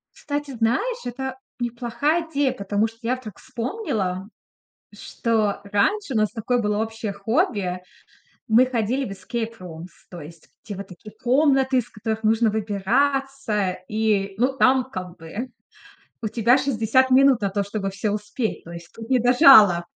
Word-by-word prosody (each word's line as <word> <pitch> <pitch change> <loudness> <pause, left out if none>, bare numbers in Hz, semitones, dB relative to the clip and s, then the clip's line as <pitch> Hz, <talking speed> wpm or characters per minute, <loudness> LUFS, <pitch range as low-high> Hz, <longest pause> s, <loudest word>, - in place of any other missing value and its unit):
Кстати, 290 -1 -4
знаешь, 265 - 0
это 260 +2 -5 0.2
неплохая 240 +7 -1
идея, 280 -4 +1
потому 205 -1 0
что 225 0 -15
я 245 +3 -1
вдруг 220 -6 -10
вспомнила, 225 - -3 0.6
что 220 -4 -1
раньше 270 - 0
у - - +1
нас 215 -1 +2
такое 240 +1 -1
было 210 -1 0
общее 225 -2 -5
хобби. 200 - -1 0.7
Мы 235 +4 +6
ходили 250 +2 -1
в 200 - -7
эскейп-румс, 190 -5 -6 0.2
то 175 -2 -9
есть 160 +2 -13
в - - -30
те 205 - -5
вот 195 +1 -7
такие 190 +3 -12
комнаты, 265 +2 +2
из 245 - -1
которых 220 +1 -4
нужно 220 +1 +3
выбираться 220 0 0
и, 210 -3 0
ну 260 +4 +1
там 260 0 +3
как 180 -3 -7
бы 205 +11 -6 0.7
у 220 - -1
тебя 235 +4 +3
60 260 -1 +2
минут 265 -1 +5
на 200 - 0
то, 200 +1 -1
чтобы 200 -1 -3
всё 200 +2 -2
успеть. 210 +2 -3
То 170 - -10
есть 170 0 -10
тут 225 0 -9
не 260 -1 +3
до 245 +1 +3
жалоб. 215 - +7
225 Hz, 160 wpm, -23 LUFS, 205-260 Hz, 0.7 s, жалоб